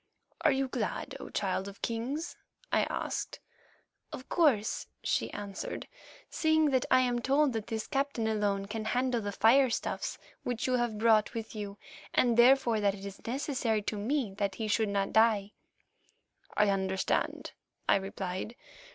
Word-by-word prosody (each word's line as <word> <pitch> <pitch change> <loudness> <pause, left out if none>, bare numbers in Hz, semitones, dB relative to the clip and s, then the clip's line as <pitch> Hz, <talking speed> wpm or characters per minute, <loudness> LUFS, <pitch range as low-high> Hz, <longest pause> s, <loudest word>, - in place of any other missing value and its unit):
"Are 310 - +5
you 270 0 +1
glad, - - -3
O - - -8
Child 190 - -1
of 200 0 -11
Kings?" 255 +8 -3 0.4
I - - +3
asked. - - -3 0.7
"Of 255 - -8
course," 270 -11 +2 0.2
she - - 0
answered, 200 -1 -6 0.4
"seeing 315 -2 +2
that 265 +2 +1
I 255 - +6
am 245 -1 +1
told 275 +2 +2
that 220 -2 -3
this 220 -2 -3
captain 275 -4 -1
alone 205 -2 0
can 215 +2 -5
handle 250 +1 +1
the 205 -1 -3
firestuffs 235 +4 +2 0.2
which 245 -2 -2
you 255 - +1
have 240 -3 -1
brought 220 -1 +3
with 225 -1 -5
you, 205 -2 -6 0.4
and, 240 -2 +4
therefore, 240 -2 +5
that 200 -1 +2
it 195 0 -9
is 195 -1 -8
necessary 245 -4 -1
to 215 - -2
me 225 +1 -1
that 200 -2 0
he 220 +3 -3
should 215 0 +1
not 200 -1 -1
die." 215 -2 +4 1.1
"I 210 0 +4
understand," 190 -1 -1 0.4
I - - +5
replied. 195 +2 -4
225 Hz, 155 wpm, -31 LUFS, 205-255 Hz, 1.1 s, I